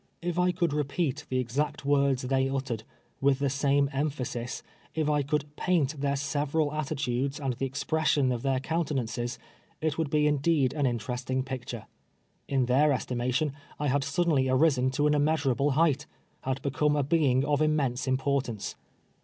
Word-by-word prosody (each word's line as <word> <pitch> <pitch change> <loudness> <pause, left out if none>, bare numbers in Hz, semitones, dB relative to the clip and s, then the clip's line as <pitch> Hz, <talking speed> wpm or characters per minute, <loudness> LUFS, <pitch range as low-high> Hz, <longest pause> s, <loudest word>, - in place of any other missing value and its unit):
If 175 0 -1
I 180 0 +3
could 170 -4 0
repeat 145 0 -1
the 130 - 0
exact 140 +4 -1
words 140 -2 +2
they 135 +1 +1
uttered, 130 -5 -3 0.4
with 135 -1 +3
the 140 -1 0
same 140 0 +2
emphasis 135 -4 -3 0.2
— - - -30
if 155 -2 0
I 150 -1 +2
could 150 +1 -2
paint 155 -6 0
their 140 -1 +1
several 145 +2 0
attitudes, 140 -2 -2
and 135 -3 -1
the 135 +3 -3
expi 150 +4 -1
ession 145 -4 +3
of 120 - -3
their 135 -1 +1
countenances 135 -6 -2 0.2
— - - -35
it 155 0 -1
would 160 -3 0
be 150 +1 +2
indeed 145 -2 +2
an 145 -3 +1
interesting 125 +2 -2
picture. 125 -4 -6 0.6
In 135 -2 +1
their 140 +5 +4
estimation, 125 +2 0 0.2
I 145 -1 0
had 140 +1 +1
suddenly 140 -2 +1
arisen 130 -1 +3
to 140 +3 0
an 150 - +4
immeasurable 145 -2 +2
height 155 -2 +2 0.2
— - - -40
had 135 0 -2
become 145 +2 +1
a 145 - +2
being 140 -3 +2
of 145 0 +1
immense 140 -5 +1
importance. 130 -4 -1
140 Hz, 170 wpm, -28 LUFS, 130-150 Hz, 0.6 s, their